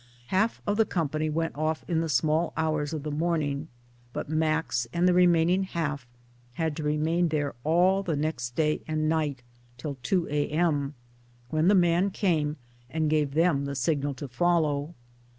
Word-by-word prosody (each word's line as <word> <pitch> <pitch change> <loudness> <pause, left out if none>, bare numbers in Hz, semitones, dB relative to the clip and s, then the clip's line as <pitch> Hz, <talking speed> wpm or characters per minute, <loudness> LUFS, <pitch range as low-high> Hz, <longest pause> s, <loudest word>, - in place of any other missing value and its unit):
Half 215 +5 +1
of 205 0 0
the 225 - +4
company 155 -2 -1
went 165 +2 -2
off 155 +1 -2
in 165 -2 +1
the 165 - -2
small 155 +4 +1
hours 155 -2 0
of 155 -3 -4
the 150 - -3
morning, 155 -2 -1 0.5
but - - -4
Max 155 -6 0
and 175 +4 +2
the 180 - +4
remaining 175 0 +4
half 150 -8 -3 0.5
had 160 +1 -1
to 155 - -3
remain 155 +4 +1
there 145 -3 -1
all 180 +5 +3
the 175 -5 -1
next 130 -5 -3
day 155 -1 +1
and 155 0 0
night 150 -5 -1 0.3
till 140 +3 -5
2 175 +7 0
a.m., 150 -1 0 0.6
when 155 +2 +2
the 205 - +6
man 175 +1 +3
came 160 -6 0 0.3
and 155 +1 0
gave 150 -2 +1
them 160 -4 +3
the 140 0 -4
signal 140 +1 0
to 140 +2 -6
follow. 155 +2 +1
155 Hz, 170 wpm, -27 LUFS, 145-170 Hz, 0.6 s, the